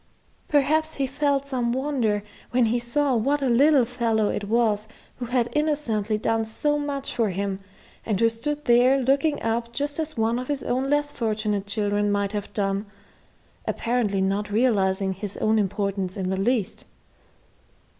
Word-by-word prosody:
Perhaps 310 +2 +2
he 275 - 0
felt 280 +1 0
some 245 -4 -1
wonder 250 -7 0 0.3
when 245 -1 +3
he 235 +2 +1
saw 270 +4 0
what 275 +6 +1
a 265 - +2
little 270 +2 +5
fellow 230 -3 0
it 205 - -2
was 215 -1 +1 0.3
who 250 - -4
had 245 0 +1
innocently 250 -9 0
done 225 +1 0
so 295 +7 -1
much 280 -2 -3
for 225 -3 +1
him, 195 +1 -2 0.4
and 210 -4 -1
who 230 - +5
stood 295 +6 -3
there 245 +3 +5
looking 275 +4 +1
up 230 +1 -1
just 285 +4 -2
as 315 -3 -3
one 225 +2 +1
of 255 - -5
his 285 -2 -2
own 260 +2 -1
less 290 0 +1
fortunate 215 -4 -1
children 205 0 +1
might 200 -1 0
have 205 -1 -4
done 200 0 -1 0.8
apparently 230 -5 0
not 195 +2 0
realizing 195 -4 +2
his 195 +1 -6
own 220 0 +2
importance 195 -2 -2
in 190 -1 -2
the 190 - -1
least. 220 -1 0
235 Hz, 165 wpm, -24 LUFS, 205-275 Hz, 0.8 s, little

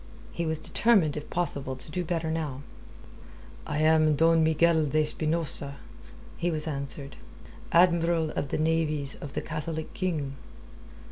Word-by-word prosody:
He 170 -1 -3
was 160 0 +1
determined 190 -4 +2
if 150 - -6
possible 140 -6 -2
to 130 +4 -10
do 180 +3 -2
better 165 -1 -2
now. 150 -4 -3 1.0
"I 150 - -1
am 155 -1 +4
Don 165 +2 +4
Miguel 160 0 +3
de 155 +2 +2
Espinosa," 155 -2 -1 0.6
he 175 - 0
was 155 -2 -2
answered. 140 -1 -3 0.5
"Admiral 170 -2 +3
of 140 - -3
the - - -1
Navies 155 -3 +1
of 145 - -9
the - - -2
Catholic 160 0 -5
King." 150 -7 -2
155 Hz, 140 wpm, -28 LUFS, 150-165 Hz, 1.0 s, am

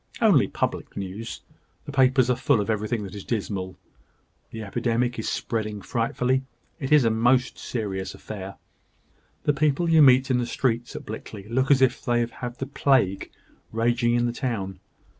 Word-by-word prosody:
"Only - - +5
public - - -3
news. 100 +4 -6 0.4
The - - -6
papers 130 -2 +4
are - - +2
full 120 - +2
of 105 +2 0
everything 110 +1 -1
that 95 - -8
is 100 -2 -7
dismal. 95 -5 -3 0.7
The 110 -1 -7
epidemic 120 +3 -1
is 110 - -2
spreading 110 -2 -2
frightfully. 125 +2 0 0.4
It 135 -2 -4
is 150 -5 +6
a 115 - +3
most 125 +3 +2
serious 100 -5 -4
affair. 100 -2 -8 0.9
The 145 - +2
people 150 +3 +1
you 165 -1 +6
meet 130 -1 +6
in 125 - +3
the 120 - -1
streets 120 -1 -1
at - - -7
Blickley 105 -2 -8
look 130 +4 0
as 135 -2 +5
if 125 -1 +1
they 120 -1 +2
had 120 +1 -7
the 135 - -3
plague 130 -8 +1 0.4
raging 120 +1 +1
in 120 0 +2
the 120 - -1
town. 100 -8 -3
120 Hz, 170 wpm, -25 LUFS, 110-130 Hz, 0.9 s, is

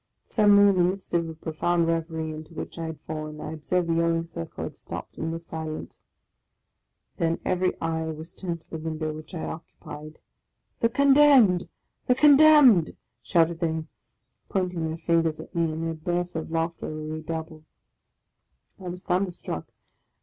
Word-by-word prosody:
Suddenly, 205 -2 +5
in 195 - +3
the 180 - +4
midst 185 +2 -2
of 170 -1 +1
a 160 - -7
profound 165 +2 0
reverie 165 -1 -2
into 155 +2 -9
which - - -6
I 165 - -3
had 160 -1 -7
fallen, 155 -1 -6
I 150 - -5
observed 170 +3 -1
the 165 - +1
yelling 165 0 +1
circle 85 - -7
had - - -6
stopped, - - -8
and 160 - -2
was 165 0 -6
silent. 160 -1 -5 1.3
Then 165 0 0
every 185 0 0
eye 160 0 -1
was 160 +1 -7
turned 170 -3 -5
to - - -23
the 160 - -4
window 155 -1 -3
which 155 +4 -9
I 160 - -4
occupied. 155 -1 -8 0.3
" - - -50
The 230 - +3
Condemned! 270 -7 +5 0.4
the 250 - +4
Condemned! 290 - +7
" - - -53
shouted 170 -2 +2
they, 160 -1 -1 0.6
pointing 180 -4 -1
their 160 +1 -4
fingers 165 -1 +1
at - - -10
me; 165 -2 +1
and 160 +1 -4
their 165 - -1
bursts 175 +2 -2
of 160 - -4
laugh 165 +1 0
ter - - -5
were 155 0 -5
redoubled, 155 0 -6 1.1
I 185 - -8
was 180 +1 -6
thunderstruck. 180 - -2
165 Hz, 170 wpm, -26 LUFS, 160-180 Hz, 1.3 s, Condemned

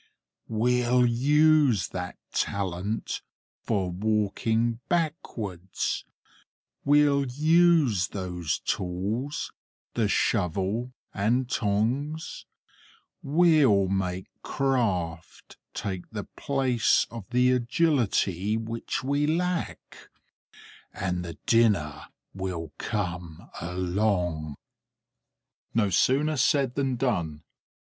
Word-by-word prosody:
We'll 125 +2 +2
use 145 - +4
that 90 0 -5 0.2
talent 100 +2 -2 0.4
for 95 -5 -1
walking 110 +3 0
backwards; 115 - -2 0.8
we'll 145 -1 +4
use 155 - +3
those 90 -4 -3
tools, 100 +10 -2 0.4
the 115 -3 +1
shovel 100 +4 0 0.2
and 120 +6 +1
tongs; 125 +9 -1 0.7
we'll 140 - +4
make 95 -1 -1 0.2
craft 100 - -2 0.2
take 95 -3 -4
the 105 -2 -5
place 130 -4 +2
of 115 -5 -8
the 125 +1 +3
agility 120 - +1
which 115 +3 -4
we 140 +2 +1
lack; 175 +2 -3 0.8
and 90 -2 -2
the 85 -3 -7
dinner 105 -11 +2 0.3
will 90 -5 -4
come 90 -5 -4
along." 90 -3 -1 1.2
No 105 -4 +2
sooner 145 - +2
said 135 0 +2
than 135 -2 0
done. 85 - -1
110 Hz, 80 wpm, -27 LUFS, 95-135 Hz, 1.2 s, use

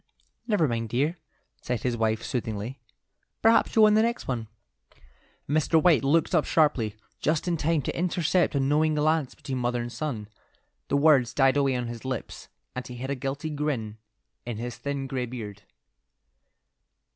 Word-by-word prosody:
"Never 205 -9 +3
mind, 115 -2 -2
dear," 145 +9 0 0.4
said 120 -3 -3
his 125 -2 0
wife, 110 -1 0
soothingly; 115 +1 -4 0.6
"perhaps 225 +1 +4
you'll 220 -1 +7
win 210 - +5
the 215 - +5
next 235 +1 -1
one." 115 -4 -2 1.0
Mr. 155 +2 +3
White 160 -3 +4
looked 160 +6 +2
up 160 -4 +4
sharply, 130 -9 +2 0.2
just 155 +3 0
in 175 - +1
time 160 -1 +1
to - - -3
intercept 175 -1 +1
a - - +2
knowing 150 +3 +2
glance 155 -2 +1
between 130 -2 -4
mother 120 0 0
and 120 0 -4
son. 120 -8 -4 0.6
The 140 - +1
words 140 -5 +4
died 135 -1 +4
away 140 -2 +2
on 125 -1 -2
his 115 -1 -7
lips, 130 -3 -5 0.3
and 125 - -5
he 125 - -8
hid 130 +3 -4
a - - 0
guilty 140 +4 -4
grin 130 -8 -3 0.4
in 120 -3 -5
his 120 +1 -5
thin 140 0 -3
grey 130 -2 -3
beard. 105 -4 -7
135 Hz, 170 wpm, -27 LUFS, 120-155 Hz, 1.0 s, you'll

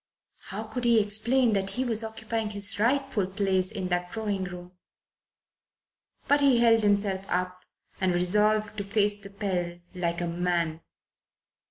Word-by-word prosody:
How - - -5
could 250 - -6
he 235 -2 +5
explain 220 +4 +2
that 195 -1 0
he 255 +4 -2
was 225 -2 +1
occupying 220 0 -3
his 205 0 0
rightful 255 -3 +1
place 190 -1 0
in 190 -4 -4
that 180 0 -1
drawing 205 -4 -2
room? 180 0 -9 1.6
But 285 0 +4
he 275 -3 +5
held 230 -1 +5
himself 200 -2 +1
up 180 0 -2 0.4
and 185 -1 +2
resolved 210 +5 +1
to - - -2
face 205 0 0
the 200 - -10
peril 185 -4 -3 0.2
like 170 -2 -2
a 175 - -1
man. 170 -2 -1
205 Hz, 150 wpm, -27 LUFS, 180-220 Hz, 1.6 s, he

